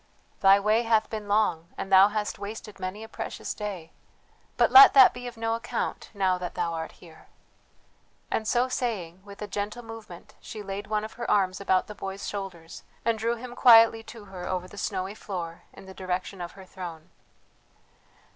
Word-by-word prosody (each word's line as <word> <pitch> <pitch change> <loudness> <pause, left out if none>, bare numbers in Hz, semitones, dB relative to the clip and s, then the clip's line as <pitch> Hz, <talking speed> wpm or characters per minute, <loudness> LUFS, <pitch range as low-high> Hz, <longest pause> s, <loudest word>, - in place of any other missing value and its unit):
"Thy 195 +1 +6
way 215 +3 +2
hath 225 -2 +1
been 215 -2 -5
long, 200 -6 +1
and 195 - -5
thou 190 +1 +8
hast 210 -1 -3
wasted 210 +1 -8
many 185 +4 -5
a - - -9
precious - - -5
day, 190 -6 -6 0.7
but - - +3
let 400 -4 +10
that 265 -2 +8
be 245 0 -7
of 240 -1 -9
no 225 0 -1
account 230 - -4
now 190 -2 +1
that 180 -1 -6
thou 170 -1 -1
art 160 0 -5
here," 165 -3 -17 1.0
and 220 - -1
so 245 +3 +2
saying, 195 -9 -3
with 200 +1 -10
a - - -5
gentle 205 +4 -4
movement 225 -6 -11
she 215 -2 -8
laid 200 +1 -6
one 215 0 -1
of 215 - -7
her 240 - -5
arms 190 -2 +2
about 190 -1 +2
the 210 - -9
boy's 195 -1 -6
shoulders 185 -5 -7 0.2
and 230 -1 +1
drew 230 +2 0
him 245 +1 -9
quietly 225 -2 +7
to 220 -1 -12
her 185 -2 -8
over 185 -1 -3
the 195 - -14
snowy 195 -1 -3
floor 175 -6 -7
in - - -14
the 190 - -11
direction 185 0 -4
of 175 - -6
her 190 -1 -13
throne. 175 -3 -9
200 Hz, 190 wpm, -27 LUFS, 185-225 Hz, 1.0 s, let